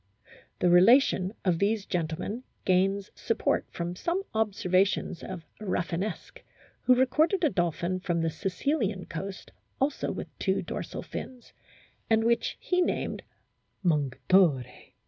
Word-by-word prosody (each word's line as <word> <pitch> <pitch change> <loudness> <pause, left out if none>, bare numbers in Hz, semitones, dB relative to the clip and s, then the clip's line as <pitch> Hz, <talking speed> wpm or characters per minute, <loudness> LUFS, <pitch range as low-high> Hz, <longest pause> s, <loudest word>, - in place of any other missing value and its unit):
The 180 - +2
relation 190 0 +5
of 175 -3 +2
these 205 0 +1
gentlemen 180 +7 -3 0.2
gains 195 +2 +2
support - - 0
from 175 +1 -4
some 345 - -1
observations 195 -4 +1
of 180 -4 -7
Rafinesque, 185 -1 -3 0.4
who 255 - +5
recorded 310 +9 +2
a 305 - +4
dolphin 175 +1 -1
from 175 -2 -1
the 165 0 0
Sicilian 200 - -1
coast 190 +3 -7 0.3
also 275 +1 0
with - - -7
two - - 0
dorsal - - -5
fins, 250 -2 -8 0.6
and 225 0 +4
which 235 +1 +1
he 360 0 +1
named - - -1 0.3
" - - -46
Mongitore." 150 -1 +3
190 Hz, 125 wpm, -28 LUFS, 175-230 Hz, 0.6 s, relation